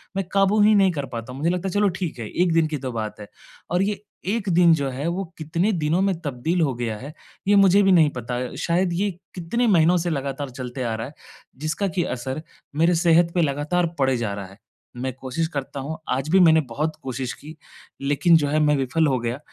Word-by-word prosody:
मैं 195 -1 -1
काबू 195 +2 +3
ही 210 +1 +6
नहीं 195 -2 +4
कर 145 -5 -4
पाता 120 -1 -7
हूँ। 135 - -8
मुझे 160 +4 +1
लगता 180 +1 -2
है 185 - -4
चलो 205 0 +3
ठीक 175 -7 -5
है, 115 - -4
1 175 -1 +1
दिन 165 -1 +3
की 155 -1 -3
तो 130 -2 -5
बात 110 -3 -5
है। 105 - -9 0.4
और 180 +1 +2
ये 205 0 -2 0.3
1 210 0 -1
दिन 170 -1 +6
जो 140 -3 -2
है 135 +4 -4
वो 180 +3 -1
कितने 170 +6 0
दिनों 165 -1 0
में 195 -1 +1
तब्दील 155 +4 -1
हो 145 -5 +1
गया 115 -2 -3
है, 140 +7 -9 0.3
ये 205 - +5
मुझे 200 0 +6
भी 195 - +4
नहीं 165 -5 +5
पता। 125 0 -3 0.2
शायद 175 +1 +1
ये 200 +4 0 0.3
कितने 190 +8 -1
महीनों 175 -3 +4
से 175 0 -1
लगातार 140 -2 -3
चलते 125 0 -6
आ 115 -2 -1
रहा 110 0 -4
है, 145 - -13 0.4
जिसका 155 +8 -2
कि 175 -1 -1
असर 130 +1 -4 0.3
मेरे 165 +3 +3
सेहत 170 0 +4
पे 175 - +3
लगातार 155 +4 0
पड़े 135 -2 +2
जा 110 -4 -2
रहा 100 -1 -6
है। 95 +1 -16 0.4
मैं 130 +1 -3
कोशिश 135 +5 -3
करता 140 -3 -5
हूँ 155 +4 -5
आज 135 +3 -1
भी 190 +4 +5
मैंने 160 -2 +6
बहुत 155 +7 -2
कोशिश 130 -1 -4
की, 155 +2 -12 0.5
लेकिन 145 +5 +3
जो 145 -2 0
है 155 +2 +1
मैं 150 -1 +3
विफ़ल 140 +4 +1
हो 130 -3 +1
गया। 120 +3 -3
155 Hz, 235 wpm, -23 LUFS, 130-180 Hz, 0.5 s, ही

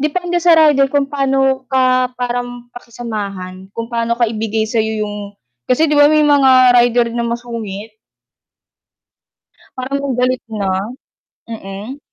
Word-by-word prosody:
depende 350 +4 -1
sa 345 -2 +6
rider 295 -3 +5
kung 285 -1 +1
pano 270 -1 0
ka 255 -1 +2
parang 245 0 -4
pakisamahan, 200 -6 -7
kung 230 0 -4
pano 235 0 0
ka 240 - -2
ibigay 220 0 -2
sayo 220 -2 -1
yung 205 -1 -7 0.3
kasi 310 +6 +3
'di 295 - +2
ba 290 - +7
may 305 0 +4
mga 260 -4 +5
rider 240 0 +3
na 235 0 -2
masungit. 225 -3 -6 1.8
Parang 275 +1 -3
galit 255 0 0
na, 205 -3 -2 0.8
mm. 215 +4 -8
245 Hz, 130 wpm, -16 LUFS, 220-270 Hz, 1.8 s, ba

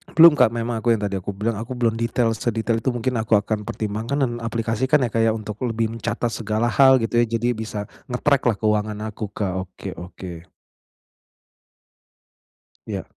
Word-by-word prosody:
Belum, 165 0 +10
Kak, 125 -3 +6
memang 115 0 -2
aku 120 - 0
yang 105 - -5
tadi 100 - -2
aku 100 +2 -5
bilang, 110 +2 -1
aku 115 - -8
belum 115 -2 +2
detail 115 0 +1
sedetail 115 0 -1
itu, 115 - -8
mungkin 125 +2 -1
aku 110 0 -1
akan 105 +1 -2
pertimbangkan 110 +5 -3
dan 120 - +1 0.2
aplikasikan, 115 +5 +1
Kak, 115 - +1
ya, 110 - +4
untuk 105 -1 -6
lebih 115 0 0
mencatat 115 +1 -2
segala 110 +1 -1
hal 135 -1 +6
gitu 115 - -2
ya. 120 - +4
Jadi 120 +1 0
bisa 110 -2 -4 0.3
nge-track 140 +2 +2
lah 115 - +3
keuangan 105 -1 0
aku, 105 - -5
Kak. 100 -3 -2
Oke 90 -1 -9
oke. 90 0 -8 2.5
Iya. - - -4
115 Hz, 175 wpm, -22 LUFS, 105-120 Hz, 2.5 s, Belum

